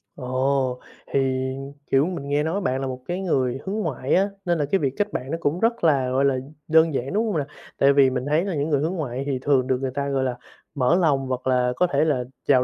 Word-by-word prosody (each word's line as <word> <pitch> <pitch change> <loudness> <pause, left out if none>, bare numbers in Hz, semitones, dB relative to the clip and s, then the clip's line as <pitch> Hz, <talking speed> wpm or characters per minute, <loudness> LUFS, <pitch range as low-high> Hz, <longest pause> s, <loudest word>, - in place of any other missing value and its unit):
Ồ, 130 0 0 0.3
thì, 140 - 0 0.7
kiểu, 135 +3 +4
mình 170 -6 -5
nghe 145 +1 +1
nói 180 +6 -1
bạn 130 -3 -1
là 135 - -2
một 130 0 -5
cái 180 +2 -2
người 130 -8 0
hướng 195 +2 -3
ngoại 140 - -2
á, 195 +2 +3 0.2
nên 175 -1 +1
là 150 - 0
cái 195 - +3
việc 135 -3 0
kết 205 0 -1
bạn 130 +2 -4
nó 165 - -1
cũng 170 +1 0
rất 230 0 +1
là, 140 -6 +3
gọi 130 +2 +2
là, 135 -1 +3 0.3
đơn 160 -1 +4
giản, 135 +4 -2
đúng 215 +3 +1
hông 200 -7 0
nè? 145 - 0 0.3
Tại 140 0 +5
vì 140 -1 +5
mình 130 0 -3
thấy 155 +5 +1
là 190 -5 -2
những 145 +2 -1
người 145 -2 +2
hướng 165 +4 -1
ngoại 135 -5 -3
thì 135 -3 -1
thường 135 -3 +2
được 130 - +2
người 130 -1 -2
ta, 140 +1 -2
gọi 135 -1 0
là, 125 -1 -2 0.4
mở 135 +4 +3
lòng 145 -7 +2
hoặc 130 0 -3
là 125 -1 +2
có 180 +6 +2
thể 145 0 +2
là 135 -5 +1 0.2
chào 130 -3 +5
140 Hz, 260 wpm, -23 LUFS, 130-165 Hz, 0.7 s, Tại